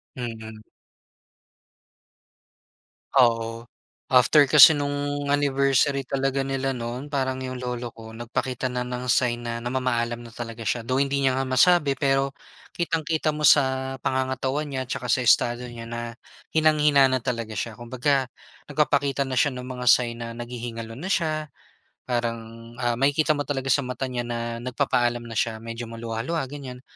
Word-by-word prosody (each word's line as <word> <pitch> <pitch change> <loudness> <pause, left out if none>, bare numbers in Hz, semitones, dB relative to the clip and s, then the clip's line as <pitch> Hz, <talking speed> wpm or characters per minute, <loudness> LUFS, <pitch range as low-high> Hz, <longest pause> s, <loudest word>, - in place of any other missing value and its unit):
Mhm. 110 -3 -7 2.5
Oo, 115 -2 +3 0.5
after 130 +4 +6
kasi 150 +1 +9
nung 145 0 -2
anniversary 140 -1 +2
talaga 135 +1 -1
nila 135 -1 -2
noon, 120 +4 -5
parang 130 -2 -1
'yong 130 0 -5
lolo 125 -1 -4
ko 110 -1 -11
nagpakita 120 +2 -3
na 125 0 -2
ng 125 0 -5
sign 120 -1 +2
na 115 0 -4
namamaalam 120 -2 -1
na 120 -1 -11
talaga 115 -2 -6
siya. 120 -2 -1
Though, 130 +3 0
hindi 140 0 0
niya 130 0 +2
nga 135 - -1
masabi 140 +2 +4
pero, 135 0 +1 0.4
kitang-kita 160 -2 0
mo 150 - -5
sa 130 -1 +3
pangangatawan 130 +3 -1
niya 130 -1 -3
tsaka 125 0 -4
sa 125 +2 +2
estado 120 +1 +3
niya 115 -1 -8
na, 115 0 -5 0.4
hinang-hina 150 -3 +4
na 130 -2 -1
talaga 115 -4 -3
siya. 115 +1 -3
Kumbaga, 130 +2 0 0.4
nagpapakita 140 -1 +1
na 130 - -5
siya 145 - +4
nung 125 +1 -6
mga 125 -1 -5
sign 120 -1 +3
na 115 0 -6
naghihingalo 120 -1 -6
na 155 +11 -7
siya, 155 -4 0 0.6
parang 120 -1 -1 0.4
ah, 120 -1 0
makikita 145 +3 +2
mo 145 - -2
talaga 135 -2 -3
sa 140 0 +2
mata 125 +1 -4
niya 120 -1 -3
na 115 0 -3
nagpapaalam 120 -1 0
na 115 -2 -7
siya, 110 0 -1
medyo 115 +1 -6
maluha-luha, 115 +7 -3
ganyan. 130 -3 -8
130 Hz, 150 wpm, -25 LUFS, 120-140 Hz, 2.5 s, kasi